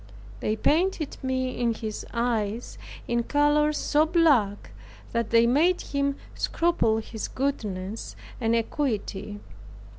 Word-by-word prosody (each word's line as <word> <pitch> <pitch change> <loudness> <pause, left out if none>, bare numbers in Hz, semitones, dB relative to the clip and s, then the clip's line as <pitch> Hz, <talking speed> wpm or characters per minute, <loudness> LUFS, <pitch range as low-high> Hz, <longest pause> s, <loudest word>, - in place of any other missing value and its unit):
They 215 - 0
painted 320 - +1
me 260 -1 -2
in 235 -2 +1
his 220 -2 -5
eyes, 230 -2 -2 0.3
in 235 0 +1
colors 295 +3 +2
so 300 +1 +3
black, 285 - +2 0.4
that 235 -2 -1
they 230 0 +5
made 315 +9 +3
him 280 0 -1 0.2
scruple 330 -10 +1
his 220 0 -5
goodness 215 -7 -3 0.2
and 230 -1 +2
equity. 210 -5 -2
240 Hz, 115 wpm, -26 LUFS, 220-290 Hz, 0.4 s, they